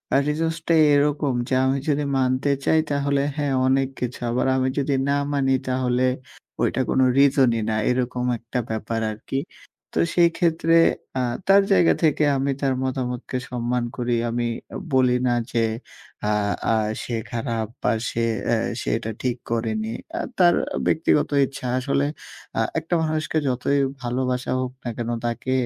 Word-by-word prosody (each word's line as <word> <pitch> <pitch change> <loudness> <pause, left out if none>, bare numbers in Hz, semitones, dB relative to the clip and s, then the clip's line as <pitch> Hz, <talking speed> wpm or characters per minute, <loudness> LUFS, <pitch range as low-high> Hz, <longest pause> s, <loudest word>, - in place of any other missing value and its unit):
আ - - +6
reasons 160 +2 0
টাই 165 -2 +5
এরকম 145 -1 +1
যে 135 - -2
আমি 135 +1 +2
যদি 145 0 +1
মানতে 130 +1 +1 0.2
চাই 160 - +4
তাহলে 140 0 +1
হ্যাঁ, 145 -2 -1
অনেক 135 0 +2
কিছু। 125 0 -3
আবার 120 +2 0
আমি 130 0 +1
যদি 140 0 +1 0.2
না 140 - +3 0.2
মানি, 135 -2 +2
তাহলে 125 -1 +1 0.6
ওইটা - - +1
কোনো 130 - +3 0.2
রিজনই 130 -4 +4
না। 110 - 0
এরকম 125 0 -1
একটা 115 +2 -4
ব্যাপার 110 +1 -2
আরকি। 110 +5 -4 0.6
তো - - +4
সেই 170 -1 +6
ক্ষেত্রে 165 -1 +2 0.5
আ - - +1 0.3
তার 195 +1 +7
জায়গা 175 -3 +5
থেকে 155 -1 +3
আমি 135 +1 0
তার 135 -2 +2
মতামতকে 130 -1 -3
সম্মান 125 0 -1
করি। 120 -1 0
আমি 120 +1 -1 0.5
বলি 130 -1 +4
না 120 - +2 0.2
যে 115 - +1 0.7
আ - - +2 0.4
আ - - +3 0.3
সে 120 - -3 0.2
খারাপ 115 -2 -2 0.2
বা - - +3 0.2
সে 115 - -2 0.3
এ্যা 120 - +3 0.2
সে - - -3
এটা 115 -1 -5
ঠিক 125 -1 -1
করেনি। 110 -1 -1 0.3
আ - - -1 0.2
তার 175 -2 +5 0.3
ব্যক্তিগত 155 -2 +2 0.2
ইচ্ছা 135 -1 -7
আসলে 140 +2 0 0.5
আ - - +4 0.2
একটা 160 +2 -6
মানুষকে 155 0 -1
যতই 130 +2 +1 0.2
ভালোবাসা 125 0 -1
হোক 130 -1 -2
না 120 - -3
কেন, 120 -1 -3 0.2
তাকে 120 +2 -2
130 Hz, 160 wpm, -23 LUFS, 120-145 Hz, 0.7 s, তার